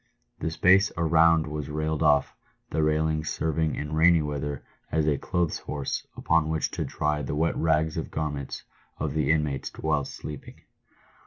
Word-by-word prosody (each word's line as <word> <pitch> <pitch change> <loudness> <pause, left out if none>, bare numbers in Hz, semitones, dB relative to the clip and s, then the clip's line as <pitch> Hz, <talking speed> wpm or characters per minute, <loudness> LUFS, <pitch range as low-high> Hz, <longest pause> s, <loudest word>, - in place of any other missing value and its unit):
The 80 - -1
space 95 +5 +4
around 80 -1 +4
was 75 -1 -5
railed 75 +1 -2
off, 75 -3 +3 0.4
the 80 - 0
railings 75 0 +1
serving 80 0 0
in 75 +1 -4
rainy 80 0 +5
weather 75 -1 -4 0.3
as 80 -1 +1
a 75 -2 +2
clothes 85 -3 -1
horse 70 -2 -4
upon 80 -2 +2
which 80 0 -1
to - - -3
dry 75 0 -1
the 70 +1 -3
wet 80 +2 +1
rags 80 -1 +1
of - - -3
garments 75 -3 -4 0.3
of 75 -2 -2
the 75 -3 0
inmates 75 -4 0
whilst 75 -3 -1
sleeping. 75 -3 -9
75 Hz, 160 wpm, -26 LUFS, 75-80 Hz, 0.4 s, rainy